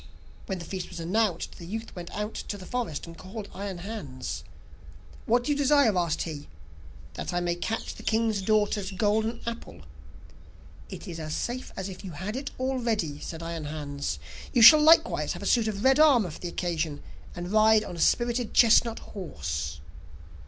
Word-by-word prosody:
When 190 - -2
the 170 - -7
feast 185 0 -5
was 175 - -8
announced, 185 +1 -1
the 170 - -9
youth 225 +4 -6
went 175 -1 -7
out 210 +1 -4
to 205 - -5
the 185 - -10
forest, 235 - -3
and 165 -1 -10
called 200 +4 -8
Iron 195 -1 -5
Hans. 175 -9 -6 0.8
'What 240 +2 +3
do 290 - -1
you - - +2
desire?' 285 -6 +4
asked 170 -3 0
he. 155 -3 -6 0.7
'That 85 - -5
I - - +2
may 175 -1 0
catch 220 +6 -3
the - - -11
king's 220 -2 +1
daughter's 205 -1 +1
golden 215 +4 0
apple.' 230 - -6 1.1
'It - - -8
is 165 -2 -6
as 155 0 -4
safe 250 +2 -4
as 190 - -3
if 190 0 -9
you 185 -3 -7
had 190 +8 -5
it 275 +2 -4
already,' 230 - -1
said 165 +1 -7
Iron 165 -2 -4
Hans. 145 -2 -4 0.3
'You 240 -4 +4
shall 305 +6 +11
likewise 320 +2 +5
have - - -8
a - - -5
suit 230 -3 +3
of 205 -1 -3
red 265 +2 +5
armour 255 - +5
for - - -10
the 180 - -5
occasion, 165 -4 -2 0.3
and 175 +1 -5
ride 215 0 +5
on 190 - -7
a - - -8
spirited 240 +4 +1
chestnut 230 0 +5 0.2
horse. 75 - -4
200 Hz, 185 wpm, -27 LUFS, 170-230 Hz, 1.1 s, shall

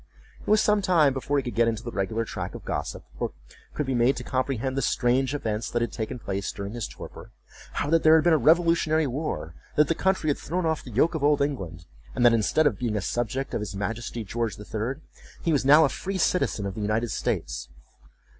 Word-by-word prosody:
It - - -17
was 215 0 +5
some 210 -1 +3
time 170 -7 +4
before 140 +2 -1
he 140 - +1
could 120 - -5
get 115 0 +3
into 115 0 -1
the 120 - -5
regular 110 +3 -1
track - - -5
of - - -9
gossip, - - -4 0.2
or - - -2 0.4
could 150 - -1
be 135 - -1
made 125 +2 +3
to 125 - -5
comprehend 130 0 -1
the 135 - 0
strange 130 +2 +1
events 110 -4 -2
that 120 0 0
had 120 - -3
taken 110 +2 -4
place 100 -4 -3
during 100 +1 -6
his 120 -4 -3
torpor. - - -10 0.4
How - - -1
that 165 -1 +4
there 155 0 +7
had 160 - +4
been 170 -1 +4
a - - +5
revolutionary 160 +1 +3
war—that 135 - -2
the 165 - +2
country 190 -3 +1
had - - -3
thrown 180 +3 -2
off 160 -1 0
the - - -10
yoke 130 +9 +2
of 160 -3 -3
old 145 0 +4
England—and 90 - -3
that, 120 - +7
instead 115 +8 +2
of 115 -9 +2
being 115 -4 -1
a - - +1
subject 120 +6 -2
of - - 0
his 105 -2 -5
Majesty 115 +3 -4
George 115 0 -2
the 105 - -10
Third, 120 +8 -3 0.4
he 165 - +2
was 140 - +2
now 150 +4 +7
a - - +1
free 195 +4 -4
citizen 170 - +1
of 100 - -3
the 105 - -6
United 110 +3 0
States. - - -2
130 Hz, 230 wpm, -26 LUFS, 110-155 Hz, 0.4 s, there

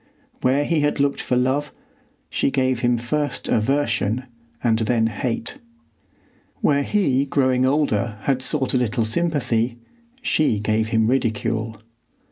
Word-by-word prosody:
Where 135 +3 +2
he 165 0 +1
had 145 0 0
looked 140 0 +1
for 125 - -1
love, 135 +4 0 0.6
she - - 0
gave 130 -2 +1
him 120 -1 +2
first 145 +5 -2
aversion 115 -2 +1 0.4
and 115 -2 +2
then 115 0 +1
hate. 115 +1 -3 1.0
Where 145 -1 +2
he 140 -6 +1
growing 130 -2 +2
older 120 -6 0
had 130 +3 0
sought 130 0 +1
a 130 - +3
little 120 -1 0
sympathy, 120 -4 0 0.5
she 150 -8 +2
gave 110 +1 0
him 110 0 +2
ridicule. 115 -3 -1
125 Hz, 130 wpm, -22 LUFS, 115-140 Hz, 1.0 s, a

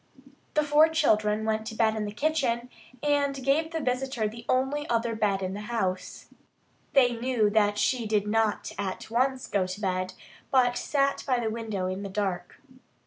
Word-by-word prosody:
The 300 - +4
four 295 +2 +5
children 220 -9 +2
went 220 0 -1
to 220 - -6
bed 220 -1 +2
in 215 -1 -2
the 205 - -4
kitchen, 250 -2 0 0.3
and 285 -2 +1
gave 310 +4 +2
the 325 -1 -3
visitor 255 -4 -1
the 230 +2 -9
only 270 +3 0
other 230 0 +1
bed 200 -3 0
in 185 0 -2
the 205 - -5
house. 190 -6 -2 0.7
They 250 -4 +5
knew 230 -3 +1
that 205 -1 +2
she 235 +1 +1
did 210 -1 +1
not 220 0 0
at 195 +2 -4
once 260 +2 +1
go 190 -2 0
to 185 +2 -6
bed, 185 -2 -2 0.3
but 245 -2 +3
sat 275 +2 0
by 255 -2 +2
the 225 -2 -1
window 220 -4 -3
in 185 +1 -3
the 200 - -5
dark. 190 -3 -3
230 Hz, 180 wpm, -27 LUFS, 210-265 Hz, 0.7 s, four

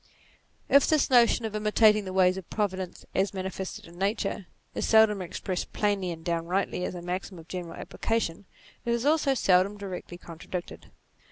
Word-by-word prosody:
If 280 - +5
this 305 -3 +2
notion 240 -1 +5
of 215 -1 -4
imitating 215 0 +4
the 185 - -5
ways 185 -1 +4
of 190 -3 -8
Providence 190 -4 -3
as 195 +1 0
manifested 190 0 -5
in 170 +1 -14
Nature, 200 -1 -1 0.3
is - - -2
seldom 220 -3 +5
expressed 180 +1 -4
plainly 200 -3 0
and 165 -1 -7
downrightly 175 +2 -1
as - - -4
a 175 - -7
maxim 180 +1 -4
of 165 -1 -12
general 175 -2 -6
application, 205 -5 -2 0.4
it 235 +1 0
also 295 -2 +3
is 260 - -2
seldom 190 +2 +3
directly 185 -3 -7
contradicted. 175 +1 -8
190 Hz, 165 wpm, -28 LUFS, 180-215 Hz, 0.4 s, If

